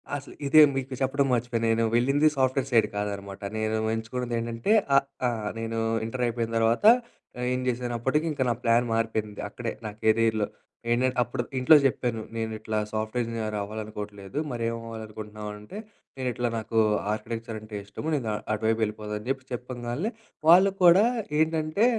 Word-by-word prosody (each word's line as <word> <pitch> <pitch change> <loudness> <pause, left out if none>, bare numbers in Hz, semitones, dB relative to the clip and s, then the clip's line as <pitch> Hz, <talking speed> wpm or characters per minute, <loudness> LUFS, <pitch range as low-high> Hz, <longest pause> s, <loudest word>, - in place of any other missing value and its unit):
అసలు 140 0 -7
ఇదే 155 +2 +7
మీకు 135 0 -3
చెప్పడం 135 +1 +2
మర్చిపోయాను 120 -1 0
నేను 115 +1 +2
వెళ్ళింది 135 +5 +4
సాఫ్ట్‌వేర్ 130 0 +1
సైడ్ 115 -3 +4
కాదన్నమాట. 100 -1 -4 0.2
నేను 110 0 0 0.2
ఎంచుకున్నది 120 +2 -3
ఏంటంటే, 115 - -2 0.2
ఆహ్, 140 - +5 0.2
ఆహ్, 110 -3 -2
నేను 115 0 -3 0.3
ఇంటరు 125 +2 -3
అయిపోయిన 115 -1 -2
తర్వాత 115 - +2 0.7
ఏం 125 - 0
చేశాను 120 0 -1
అప్పటికి 150 +7 +1
ఇంకా 140 -3 0
నా - - +3
ప్లాన్ 115 +1 +4
మారిపోయింది. 110 -2 -1
అక్కడే 115 +1 -4
నా 105 - -3
కేరియర్‌లో. 110 -1 +2 0.4
ఏంటం 125 +2 +3
అప్పుడు 120 +1 -2 0.2
ఇంట్లో 130 +5 +7
జెప్పాను 120 -3 0 0.2
నేను 110 0 -2
ఇట్లా 110 0 -3 0.2
సాఫ్ట్‌వేర్ 110 +3 -1
ఇంజనీర్ 110 -2 -3
అవ్వాలి 110 +2 -5
అనుకోవట్లేదు. 105 +1 -8
"మరేం 115 -1 -1
అవ్వాలి 115 -1 -6
అనుకుంటున్నావు" 105 0 -7
అంటే, 105 - -10 0.4
నేను 130 -1 -1
ఇట్లా 120 0 -1
నాకు 115 0 -1 0.3
ఆర్కిటెక్చర్ 115 +1 -5
అంటే 110 0 -9
ఇష్టము. 100 +9 -7
నేను 125 -6 -2 0.3
అటు 110 - -3
వైపు 115 0 +1
ఎళ్ళిపోదం 105 0 -6
అని 105 - -12
చెప్పి 135 -1 -2
చెప్పగాల్నె 125 - -3 0.4
వాళ్ళు 185 +3 +7
కూడా 180 +5 +7 0.3
ఏంటంటే, 160 +5 +2
115 Hz, 160 wpm, -27 LUFS, 110-130 Hz, 0.7 s, ఇదే